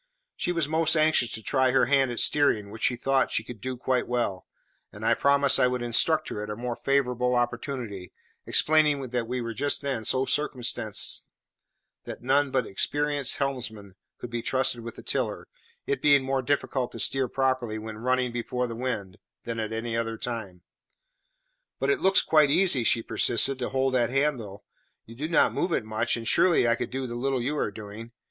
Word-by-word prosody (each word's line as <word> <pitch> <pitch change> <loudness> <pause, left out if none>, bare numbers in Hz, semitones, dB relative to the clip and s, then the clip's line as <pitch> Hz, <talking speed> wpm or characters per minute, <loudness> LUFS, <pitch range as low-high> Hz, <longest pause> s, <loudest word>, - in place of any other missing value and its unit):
She - - -2
was 170 -4 0
most 160 +1 +2
anxious 155 -6 +3
to 110 - -3
try 130 +1 +2
her 130 - +3
hand 135 0 +3
at 120 - -4
steering, 110 -9 +2
which 110 - -10
she 125 - +2
thought 135 +2 +1
she 110 - 0
could 115 -2 -10
do 130 +1 -4
quite 125 0 -1
well; 120 -7 -2 0.4
and 105 +2 -8
I 115 - +4
promised 140 +2 +3
I 125 - +5
would 125 -1 -2
instruct 155 +7 +2
her 105 - -5
at 105 - -6
a 105 - -4
more 120 +1 -4
favourable 125 -2 0
opportunity, 120 -5 -3 0.4
explaining 150 -2 +4
that 120 -1 -3
we 125 +1 -3
were 115 -1 -4
just 140 +4 -1
then 135 -5 -2
so 130 +4 +1
circumstanced 135 -5 -1 0.8
that - - -8
none 140 +2 +2
but 130 -2 0
experienced 145 +6 +1
helmsmen 115 -8 -4 0.2
could 120 - -8
be 120 0 -3
trusted 130 0 0
with 115 0 -8
the - - -11
tiller, - - -2 0.4
it 420 - -2
being 140 -2 +5
more 135 0 -1
difficult 130 -1 -1
to - - -8
steer 135 -1 +1
properly 130 -3 -1
when 110 0 -7
running 125 +1 0
before 125 +1 -2
the 120 - -5
wind 110 -7 -4 0.2
than 115 -1 -4
at 110 -1 -3
any 115 +1 -3
other 115 -1 -2
time. 105 -8 -6 1.2
"But - - +1
it 400 - 0
looks 190 0 +4
quite 155 -2 +4
easy," 165 -5 +3
she 115 0 +2
persisted, 130 +5 +1
"to 125 - -2
hold 135 0 0
that 120 -3 +2
handle. 125 -7 -1 0.4
You 115 - -12
do 145 +7 -4
not 165 - +3
move 175 - -1
it 115 - 0
much, 110 +2 -1
and 115 -1 -6
surely 170 -6 +4
I 115 - +4
could - - -3
do 135 0 -4
the 120 - -6
little 130 +1 -1
you 145 +4 -1
are - - 0
doing. 110 +3 -10
125 Hz, 195 wpm, -26 LUFS, 115-140 Hz, 1.2 s, I